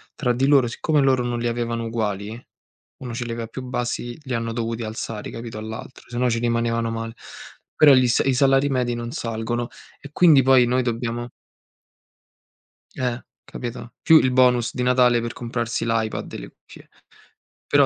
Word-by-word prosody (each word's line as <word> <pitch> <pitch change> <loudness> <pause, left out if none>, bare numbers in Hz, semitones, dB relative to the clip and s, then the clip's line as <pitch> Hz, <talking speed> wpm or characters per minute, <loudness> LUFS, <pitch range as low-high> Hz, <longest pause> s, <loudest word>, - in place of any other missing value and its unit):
tra 125 -4 0
di 135 +3 +1
loro 135 -4 +5
siccome 150 +5 0
loro 130 -2 +3
non 120 -1 -2
li 120 - -1
avevano 115 -1 -2
uguali, 110 0 -4 0.5
1 125 -3 -6
ce 120 +1 -4
li 120 - -5
aveva 115 -1 -4
più 130 +3 -8
bassi, 120 -1 -3
li 130 -2 -5
hanno 115 0 -2
dovuti 115 0 -3
alzare, 110 -1 -5
capito, 115 -2 -7
all'altro, 110 +3 -8
se 120 - -7
no 125 0 +2
ci 115 0 0
rimanevano 115 -1 0
male. 115 0 -5 0.6
Però 145 -3 +7
gli 130 -1 +5
sa 120 - +2
i 135 - +2
salari 135 +2 +3
medi 125 -2 0
non 120 0 -5
salgono 115 +1 -3 0.3
e 145 - -11
quindi 160 -6 +6
poi 130 -1 +5
noi 125 +2 +1
dobbiamo 120 0 -3 1.7
Eh, 125 -1 -2 0.2
capito? 120 -1 -7
Più 160 - +7
il 130 - +1
bonus 125 -2 +3
di 125 - -3
Natale 125 -1 +4
per 120 0 -4
comprarsi 115 -1 -3
l'iPad 115 -1 -2
e - - -4
le - - -9
cuffie. - - -17 0.8
Però - - +5
120 Hz, 180 wpm, -23 LUFS, 115-125 Hz, 1.7 s, Però